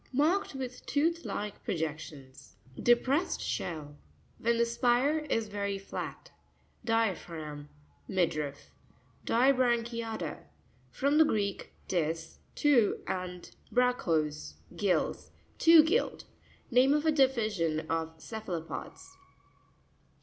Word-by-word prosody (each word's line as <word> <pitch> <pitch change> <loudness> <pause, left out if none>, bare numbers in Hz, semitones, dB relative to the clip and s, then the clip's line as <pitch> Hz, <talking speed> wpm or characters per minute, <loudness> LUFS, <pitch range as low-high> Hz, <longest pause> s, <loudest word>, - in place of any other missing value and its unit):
Marked 305 +6 +1
with 255 -2 -6
tooth 330 +4 +1
like 210 0 -4
projections. 150 - -5 0.3
DEPRESSED 265 +8 +2
SHELL.—Whien 160 +8 -4
the 235 - +3
spire 245 +5 +2
is 225 -4 0
very 200 -1 -2
flat. 195 - -7 0.5
Di'aruracm. 170 -10 -2 0.4
—Midriff. 155 -7 -1 0.6
Di'srancuta'tTa. 235 - +1 0.2
— 125 +2 -33
From 285 +3 +3
the - - +9
Greek, 205 -7 -2
dis, 165 -2 -2 0.2
two, 260 -8 +3
and 180 -1 -5 0.2
bragchos, 160 - +1 0.2
gills—two 310 - +3
gilled. 370 +10 0 0.5
Name 260 +4 +5
of 300 +1 0
a 315 - +5
division 215 - +2
of 160 0 -3
ce 220 +6 -7
phalopods. 170 -5 -6
215 Hz, 95 wpm, -30 LUFS, 160-255 Hz, 0.6 s, the